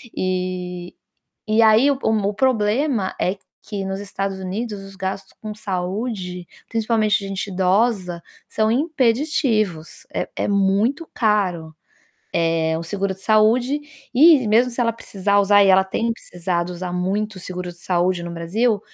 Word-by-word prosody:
E 180 -1 -3 0.5
e 220 +1 +4
aí 225 +6 +6
o 275 - 0
mo 205 -2 +1
o - - -8
problema 230 -1 +1
é 185 +2 0 0.3
que 200 -2 -5
nos 195 0 -4
Estados 195 -1 -4
Unidos, 200 +2 -4
os 195 0 -12
gastos 190 0 -5
com 215 -1 -5
saúde, 185 -2 -4 0.2
principalmente 220 -2 +1
de 195 -1 -6
gente 195 +1 -4
idosa, 185 -1 +1 0.3
são 220 0 +1
impeditivos. 240 - 0
É - - -2
é - - -2
muito 205 - +1
caro, 185 -8 0 0.8
eh, 160 -1 0
o 165 - -5
seguro 195 +2 -2
de 190 - -17
saúde. 235 +7 +3 0.3
E, 285 -2 +6
mesmo 230 +4 +4
se 235 - -6
ela 230 -2 +2
precisar 200 -2 0
usar, 205 0 +5
e 195 - +4
ela 190 0 +6
tem 225 +4 -1
precisado 175 -4 -3
usar 180 0 -5
muito 200 +4 -1
o - - -8
seguro 180 0 -5
de 175 - -15
saúde 180 0 0
no 170 0 -6
Brasil, 205 +7 0
200 Hz, 155 wpm, -21 LUFS, 185-225 Hz, 0.8 s, aí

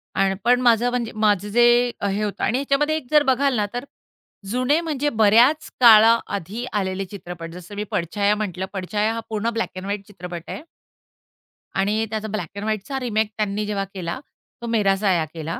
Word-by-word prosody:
अन् 195 0 +2
पण 245 +1 +4
माझं 240 0 +4
म्हणजे 245 -2 -2
माझं 210 -2 +1
जे 240 +3 +4 0.4
अ, 200 - 0
हे 200 +2 -1
होतं 205 -1 -3
आणि 240 - +1
ह्याच्यामध्ये 280 +3 +1
एक 305 - -8
जर 300 -1 +5
बघाल 270 0 +2
ना, 210 - +1
तर 245 0 -3 0.7
जुने 255 +6 +2
म्हणजे 295 -3 -1
बऱ्याच 230 +6 +4
काळाआधी 225 -2 +5
आलेले 195 -1 -1
चित्रपट. 175 -3 -8
जसं 180 +3 -10
मी 210 - -3
पडछाया 200 +5 0
म्हटलं, 190 -3 -3
पडछाया 210 +3 -1
हा 230 - -3
पूर्ण 220 +1 -1
ब्लॅक 230 - -2
अँड 185 - -6
व्हाईट 200 0 -4
चित्रपट 180 -4 -8
आहे. - - -6 1.2
आणि 210 +3 +1
त्याचा 220 0 -3
ब्लॅक 200 -7 -4
एंड 200 - -5
व्हाईटचा 220 +6 -3
रिमेक 220 -3 -1
त्यांनी 210 0 -1
जेव्हा 205 -1 -2
केला, 175 +1 -4 0.4
तो 235 - -5
मेरा 210 -4 +2
साया 185 -5 +1
केला. 160 0 -5
210 Hz, 180 wpm, -22 LUFS, 195-240 Hz, 1.2 s, जर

